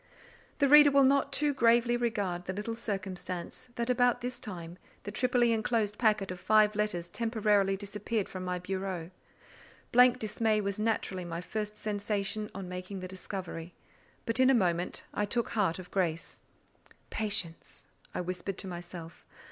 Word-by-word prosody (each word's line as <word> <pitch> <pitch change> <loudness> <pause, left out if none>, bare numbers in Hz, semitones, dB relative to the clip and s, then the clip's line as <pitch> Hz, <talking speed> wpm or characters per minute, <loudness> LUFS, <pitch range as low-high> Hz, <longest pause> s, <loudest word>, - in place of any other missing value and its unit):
The 285 - +3
reader 295 +1 +9
will 275 0 +5
not 275 +1 +3
too 295 -1 +2
gravely 235 -1 +4
regard 205 -7 -1
the 185 - -3
little 210 +4 -3
circumstance 190 -5 -5
that 235 0 -2
about 245 0 +3
this 250 0 -4
time 180 -7 -7 0.2
the 205 - -5
triply 245 +1 +2
enclosed 220 -2 0
packet 215 -5 +2
of 185 - -6
five 215 +3 +4
letters 205 -5 -1
temporarily 210 -3 +1
disappeared 210 +1 -3
from 185 -1 -6
my 180 0 -2
bureau. 185 -2 -4 0.8
Blank 250 +1 +6
dismay 220 -1 +1
was 200 0 -2
naturally 210 -4 -1
my 170 -1 -4
first 210 +3 -4
sensation 210 0 -2
on 195 -2 -5
making 185 +1 -6
the 185 - -5
discovery; 180 -2 -6 0.5
but 230 +1 0
in 260 0 +6
a 270 - +6
moment 175 -5 0
I 210 - 0
took 235 +2 0
heart 205 -8 +1
of 180 -1 -10
grace. 170 -3 -2 0.7
"Patience!" 205 -7 -3 0.3
whispered 180 +2 -3
I - - -4
to - - -7
myself. 175 -2 -8
205 Hz, 155 wpm, -30 LUFS, 185-230 Hz, 0.8 s, reader